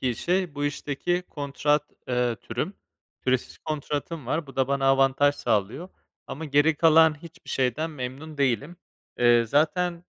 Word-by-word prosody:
iyi 125 -3 -1
şey, 180 -3 -1
bu 145 0 -2
işteki 145 +5 -2
kontrat, 145 +1 -1 0.2
eee, 125 -2 0
türüm. 150 - -4 0.5
Süresiz 130 -1 -1
kontratım 150 -1 -4
var, 155 +3 -1
bu 135 - -13
da 130 0 +1
bana 140 -1 0
avantaj 135 +1 +4
sağlıyor 115 - -1 0.4
ama 160 - -6
geri 145 +2 +3
kalan 160 -1 +5
hiçbir 170 +1 -12
şeyden 135 +5 0
memnun 145 +3 -7
değilim. 140 +5 0 0.4
Eee, 120 -1 +5
zaten 170 +7 0
145 Hz, 140 wpm, -26 LUFS, 130-160 Hz, 0.5 s, kalan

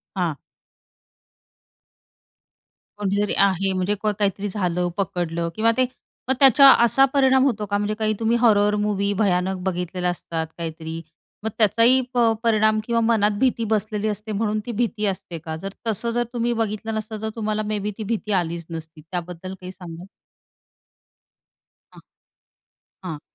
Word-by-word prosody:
हां. 175 -5 0 2.6
कोणीतरी 205 0 0
आहे, 195 0 +2
म्हणजे 185 +2 0
काहीतरी 205 -1 0
झालं 180 -3 -1
पकडलं 170 -3 -2
किंवा 225 +1 +3
ते 255 - +4 0.4
मग - - +5
त्याचा 275 0 +7 0.2
असा 255 +4 +5
परिणाम 265 -2 +4
होतो 220 -6 0
का? 205 0 -1
म्हणजे 205 +1 -1
काही 215 0 +1
तुम्ही 230 +1 +2
हॉरर 210 -3 +4
मूव्ही 200 -1 0
भयानक 190 -1 +1
बघितलेलं 180 -1 -2
असतात. 165 -2 -4
काहीतरी, 160 -1 -5 0.4
मग 220 - -1
त्याचाही 230 +4 +5
अ, - - -1
प 235 -2 +4
परिणाम 215 -1 +3
किंवा 235 0 +1
मनात 215 -2 +2
भीती 250 -2 +1
बसलेली 215 0 -1
असते. 215 +1 -4
म्हणून 215 +1 0
ती 245 - -4
भीती 225 -1 -1
असते 190 -3 -3
का? 160 0 -6
जर 195 +4 -7
तसं 225 +2 -1
जर 240 +1 +1
तुम्ही 240 0 0
बघितलं 225 -1 -2
नसतं 215 0 -5
तर 220 - -2
तुम्हाला 215 -1 -1
मेबी 210 0 -2
ती 220 - -4
भीती 215 0 -3
आलीच 170 0 -5
नसती 160 -1 -8
त्याबद्दल 180 +1 -5
काही 185 0 -7
सांगाल? 175 -2 -10 1.9
हां. - - -14 1.0
हां. 160 -5 -5
205 Hz, 145 wpm, -23 LUFS, 180-225 Hz, 2.6 s, त्याचा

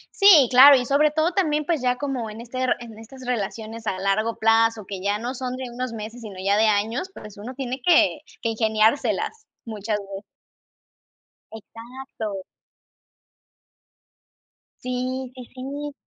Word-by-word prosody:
Sí, 370 -9 +7
claro. 275 +3 +9
Y 250 - 0
sobre 285 +4 +3
todo 315 +3 +1
también, 305 -5 0
pues, 320 -1 0
ya 250 0 +1
como 260 -5 -3
en 215 +1 -9
este 245 +2 -6
r 255 - +2
en 230 -2 -11
estas 255 +4 -12
relaciones 225 -1 -4
a 190 - -2
largo 205 +4 0
plazo, 225 -1 +3
que 195 -1 -6
ya 200 +2 0
no 240 +4 -4
son 255 -1 -4
de 255 -1 -6
unos 250 0 -4
meses, 220 +2 -7
sino 210 -4 -9
ya 200 +1 +2
de 220 - +4
años, 220 - 0
pues, 210 -1 -11
uno 235 +6 -8
tiene 260 0 -5
que 320 0 +4 0.2
que 230 - 0
ingeniárselas 220 - 0 0.2
muchas 215 -1 -3
veces. 195 -1 -8 1.3
Exacto. 225 -2 -8 2.4
Sí, 255 +1 -3
sí, 250 - -8
sí. 285 +3 -6
240 Hz, 155 wpm, -23 LUFS, 215-265 Hz, 2.4 s, claro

